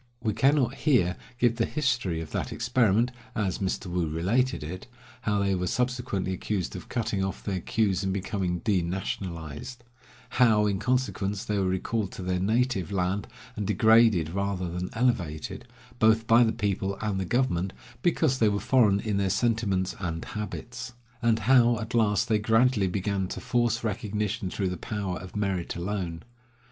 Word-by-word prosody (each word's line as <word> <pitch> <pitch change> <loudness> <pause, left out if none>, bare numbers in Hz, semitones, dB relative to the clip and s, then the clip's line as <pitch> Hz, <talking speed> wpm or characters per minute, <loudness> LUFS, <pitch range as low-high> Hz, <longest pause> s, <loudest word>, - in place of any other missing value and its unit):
We 110 - -1
cannot 135 0 +3
here 125 - +2 0.2
give 120 -1 +2
the 115 - +2
history 120 - 0
of 80 - -8
that - - -2
experiment, 115 -1 +2 0.2
as 95 -4 -1
Mr. 95 0 -2
Woo 90 -2 -1
related 100 +9 0
it 90 +8 -7 0.2
— 125 0 -22
how 105 -1 +2
they 100 -1 +1
were 90 -1 -1
subsequently 125 -7 -1
accused 95 -1 -3
of - - -8
cutting 110 -5 -1
off 95 - -4
their 95 -3 -2
queues 100 0 0
and 95 - 0
becoming 95 -2 -2
denationalized; 90 - -3 0.6
how, 110 -4 +5
in 100 -2 0
consequence, 110 -5 -1
they 105 -1 0
were 95 - +1
recalled 95 +2 -1
to 95 - -7
their 90 0 0
native 110 -1 +1
land, 95 +1 -1 0.3
and 105 -2 -3
degraded 110 -5 +4
rather 100 -1 -2
than 90 +1 -3
elevated, 100 -11 -1 0.3
both 110 0 +4
by 115 +2 +6
the 115 - +2
people 100 -2 -1
and 105 -3 -1
the - - 0
government, 100 -5 0 0.3
because 155 -5 +2
they 110 - +4
were 100 0 0
foreign 110 -3 +3
in 105 -3 -1
their 100 -1 +1
sentiments 100 -4 0
and 85 -4 -3
habits; 120 +4 -6 0.3
and 115 -1 +3
how, 120 -2 +5
at 110 0 -6
last, 105 -5 +2
they 110 -2 +2
gradually 110 -1 +3
began 95 0 -1
to - - -5
force 120 -2 0
recognition 105 -3 -2
through 95 0 -1
the 90 - -4
power 100 -1 -3
of 95 0 -10
merit 95 -4 -1
alone. 85 -2 -3
105 Hz, 170 wpm, -27 LUFS, 95-115 Hz, 0.6 s, by